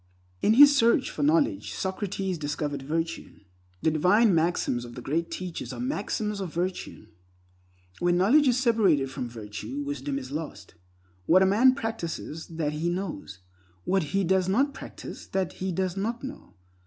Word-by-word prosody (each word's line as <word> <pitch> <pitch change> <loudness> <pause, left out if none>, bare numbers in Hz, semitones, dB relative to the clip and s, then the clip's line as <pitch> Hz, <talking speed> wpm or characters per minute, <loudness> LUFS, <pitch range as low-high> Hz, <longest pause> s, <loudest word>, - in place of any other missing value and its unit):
In 220 - +4
his 285 +2 +9
search 235 0 +3
for - - -5
knowledge 295 -1 +2
Socrates 190 -1 -3
discovered 145 -1 -3
virtue. 165 +1 -4 0.4
The 160 - +3
divine 190 +7 +4
maxims 160 -7 +1
of 120 0 -10
the 125 - -7
Great 165 +4 -1
Teachers 180 -3 -5
are - - -7
maxims 210 -4 -2
of 185 -4 -4
virtue. 180 +3 -4 0.9
When 175 0 +2
knowledge 265 +11 +5
is 245 -1 +3
separated 200 - +2
from 125 -2 -5
virtue, 110 +4 -6
wisdom 140 0 -3
is 130 -1 -7
lost. 155 +1 -6 0.5
What 185 +3 +6
a - - +5
man 235 +7 +5
practices, 170 -8 -5
that 160 -3 -3
he 160 +3 -1
knows. 175 - -5 0.4
What 190 - +1
he 195 +6 0
does 190 +1 +2
not 275 +8 +2
practice, - - -9
that 190 -2 -2
he 190 0 -1
does 185 +1 -1
not 230 +6 -3
know. 275 +2 -9
180 Hz, 160 wpm, -27 LUFS, 150-215 Hz, 0.9 s, his